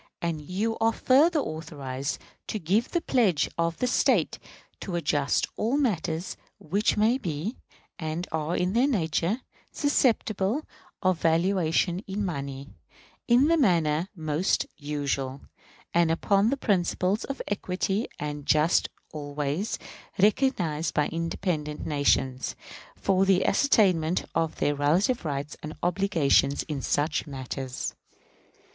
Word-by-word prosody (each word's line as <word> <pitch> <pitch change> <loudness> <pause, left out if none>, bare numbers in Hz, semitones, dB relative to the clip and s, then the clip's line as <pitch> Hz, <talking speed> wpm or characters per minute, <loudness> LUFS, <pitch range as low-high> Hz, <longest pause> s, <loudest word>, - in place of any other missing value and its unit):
And 165 -3 -2
you 205 +8 -2
are 225 0 +3
further 305 +9 +4
authorized 145 - -4 0.3
to - - -2
give 205 +6 +1
the 345 - 0
pledge 215 - +2
of 170 0 0
the - - 0
State 250 - +2 0.4
to 180 - -4
adjust 145 -4 +1
all 235 +6 +1
matters 180 - -1 0.2
which 200 +9 0
may 225 +5 +3
be, 175 - -3 0.4
and 160 +2 -3
are 160 +2 -1
in 180 +1 0
their 245 +4 +4
nature, 185 - 0 0.3
susceptible 240 -3 +1 0.4
of 185 -2 +2
valuation 170 +1 +2
in 200 +1 -2
money, 140 -4 -5 0.6
in 245 +3 +5
the 335 +1 +4
manner 170 - +2
most 155 +1 0
usual, 140 -2 -3 0.5
and 170 -1 +4
upon 195 +6 +2
the 275 - 0
principles 190 -2 +1
of 275 - -5
equity 195 +1 -1
and 145 -1 -5
justice 155 +2 +3 0.2
always 145 +5 -2 0.4
recognized 190 - +1
by 150 - +2
independent 165 -2 -3
nations, 135 -3 +1 0.4
for 190 -1 +2
the 190 -1 +3
ascertainment 185 - +3
of 165 -1 0
their 145 - +1
relative 165 - +2
rights 145 0 -3
and 155 0 -7
obligations 170 -7 +2
in 150 -4 -4
such 150 +2 0
matters.... 130 -1 -5
170 Hz, 125 wpm, -27 LUFS, 150-205 Hz, 0.6 s, in